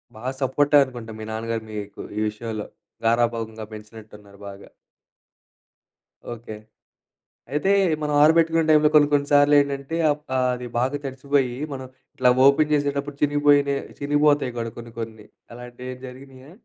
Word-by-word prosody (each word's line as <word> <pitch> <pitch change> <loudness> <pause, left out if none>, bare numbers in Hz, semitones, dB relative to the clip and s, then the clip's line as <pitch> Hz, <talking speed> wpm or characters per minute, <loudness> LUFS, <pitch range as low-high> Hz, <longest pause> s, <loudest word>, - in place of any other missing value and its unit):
బా 110 - -12 0.2
సపోర్టనుకుంటా 130 -3 +2
మీ - - -6
నాన్నగారు 115 0 -3
మీకు 105 -1 -7 0.2
ఈ 105 - 0
విషయంలో. 110 0 -6 0.4
గారాభంగా 115 -1 0
బెంచినట్టున్నారు 105 -2 -13
బాగా. 100 0 -12 1.6
ఓకే. 115 -2 -9 1.0
అయితే 150 +7 0 0.3
మనం 150 0 -1
ఆరబెట్టుకునే 165 +1 +4
టైంలో 150 -1 +5
కొన్ని 150 -1 +6
కొన్ని 145 -1 +2
సార్లేంటంటే 145 +1 +3
అప్ 150 +1 -3
ఆహ్, 130 0 +2
అది 125 0 -7
బాగా 130 +4 0
తడిచిపోయి. 135 -1 -1 0.2
మనం 130 -1 -6 0.3
ఇట్లా 125 -1 +3 0.2
ఓపెన్ 150 +2 +4
జేసేటప్పుడు 145 -1 -1
చినిగిబోయినియి 145 -1 +3 0.2
చినిగిబోతాయి 145 -2 +2
గూడా 115 -1 -4
కొన్ని 115 -1 -10
కొన్ని 110 -2 -7 0.3
అలాంటివేం 125 +1 -9
జరిగినియా? 130 +2 -13
130 Hz, 125 wpm, -23 LUFS, 115-145 Hz, 1.6 s, కొన్ని